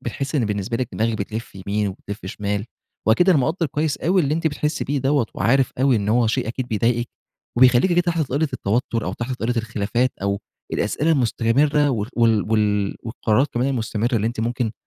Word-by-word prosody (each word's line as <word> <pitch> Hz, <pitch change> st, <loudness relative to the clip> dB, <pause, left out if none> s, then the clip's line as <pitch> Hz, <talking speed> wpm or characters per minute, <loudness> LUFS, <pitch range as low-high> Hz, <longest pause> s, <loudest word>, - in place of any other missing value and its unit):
بتحسي 135 Hz, +5 st, -3 dB
إن 130 Hz, -, +2 dB
بالنسبة 105 Hz, +2 st, -2 dB
لِك 125 Hz, -1 st, -2 dB
دماغي 115 Hz, +1 st, 0 dB
بتلّف 110 Hz, +2 st, -5 dB
يمين 100 Hz, +2 st, -2 dB
وبتلّف 100 Hz, +1 st, -8 dB
شمال، 100 Hz, +1 st, -3 dB, 0.4 s
وأكيد 175 Hz, +12 st, +4 dB
أنا 175 Hz, -, +6 dB
مقدّر 160 Hz, +6 st, 0 dB
كويس 150 Hz, +1 st, -1 dB
أوي 185 Hz, +2 st, +2 dB
اللي 150 Hz, 0 st, +1 dB
أنتِ 165 Hz, 0 st, -1 dB
بتحسي 150 Hz, 0 st, -1 dB
بيه 140 Hz, +1 st, -1 dB
دوَّة، 135 Hz, -2 st, +1 dB
وعارف 135 Hz, +2 st, +2 dB
أوي 135 Hz, -2 st, +4 dB
إن 100 Hz, -1 st, -1 dB
هو 120 Hz, +2 st, +3 dB
شيء 110 Hz, 0 st, 0 dB
أكيد 125 Hz, +1 st, -4 dB
بيضايقِك، 120 Hz, +2 st, 0 dB, 0.5 s
وبيخليكِ 125 Hz, +7 st, +5 dB
كده 175 Hz, -, +4 dB
تحت 170 Hz, -2 st, 0 dB
طائلة 145 Hz, +2 st, 0 dB
التوتر، 115 Hz, +2 st, -1 dB
أو 95 Hz, -, -2 dB
تحت 120 Hz, +4 st, -4 dB
طائلة 120 Hz, +2 st, -1 dB
الخلافات، 115 Hz, +2 st, 0 dB
أو 100 Hz, 0 st, 0 dB, 0.3 s
الأسئلة 155 Hz, +2 st, 0 dB
المستمرة 140 Hz, +3 st, +2 dB
و 110 Hz, -5 st, -1 dB
وال 110 Hz, -4 st, +2 dB
وال 105 Hz, -2 st, +1 dB
والقرارات 115 Hz, +3 st, +1 dB
كمان 125 Hz, +3 st, +1 dB
المستمرة 120 Hz, -2 st, -1 dB
اللي 110 Hz, 0 st, 0 dB
أنتِ 115 Hz, 0 st, -3 dB
ممكن 120 Hz, -1 st, -1 dB
120 Hz, 190 wpm, -22 LUFS, 110-140 Hz, 0.5 s, أنا